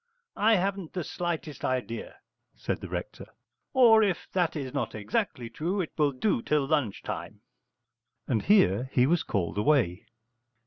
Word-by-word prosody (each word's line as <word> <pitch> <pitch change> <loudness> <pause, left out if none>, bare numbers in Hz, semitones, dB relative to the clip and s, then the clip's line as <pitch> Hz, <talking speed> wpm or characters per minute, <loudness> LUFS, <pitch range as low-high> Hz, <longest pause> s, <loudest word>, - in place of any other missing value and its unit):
'I 220 +2 +4
haven't 195 -2 -2
the 180 - -2
slightest 165 -5 -4
idea,' 120 -3 -3 0.4
said - - -3
the - - -7
rector, - - -6 0.4
'or, 235 -4 +6
if 195 -5 0
that 175 -3 0
is 135 -4 -4
not 135 -7 -2
exactly 110 +3 -2
true, 165 - -3
it 175 - -2
will 150 -2 +2
do 130 - 0
till 150 +1 +1
lunch 140 -8 0
time.' 95 +5 -6 0.9
And 115 -5 +1
here 130 - +3
he 125 - +4
was 165 +4 +2
called 100 -1 -2
away. 105 - +2
145 Hz, 150 wpm, -28 LUFS, 115-180 Hz, 0.9 s, or